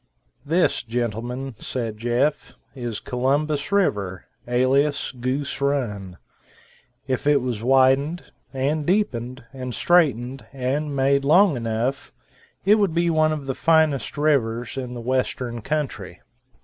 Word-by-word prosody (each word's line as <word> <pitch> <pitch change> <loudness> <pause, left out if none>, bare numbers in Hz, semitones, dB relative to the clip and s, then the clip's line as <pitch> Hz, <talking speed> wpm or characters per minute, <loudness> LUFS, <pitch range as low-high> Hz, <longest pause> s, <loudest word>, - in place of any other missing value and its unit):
"This, 165 +5 +1
gentlemen," 120 +2 -3
said 115 -4 -4
Jeff, 120 +6 0 0.2
"is 120 -5 -5
Columbus 140 +3 -1
River, 100 - 0 0.2
alias 135 +4 +1
Goose 130 +3 -3
Run. 105 -10 -2 0.9
If 130 +1 -2
it 145 -1 +5
was 125 -4 -3
widened, 135 +6 +3 0.3
and 145 +3 -1
deepened, 130 - -1
and 125 -2 -5
straightened, 135 -7 +2
and 140 +3 -2
made, 135 +1 +2
long 175 +4 +5
enough, 115 +3 -2 0.5
it 210 +2 +5
would 195 -5 +1
be 170 0 +2
one 155 -1 +3
of 150 -3 -4
the 135 - -2
finest 155 -6 +2
rivers 120 -6 +1
in 125 -2 -5
the 120 - -6
western 125 -1 -2
country." 150 +3 -3
135 Hz, 125 wpm, -23 LUFS, 120-150 Hz, 0.9 s, it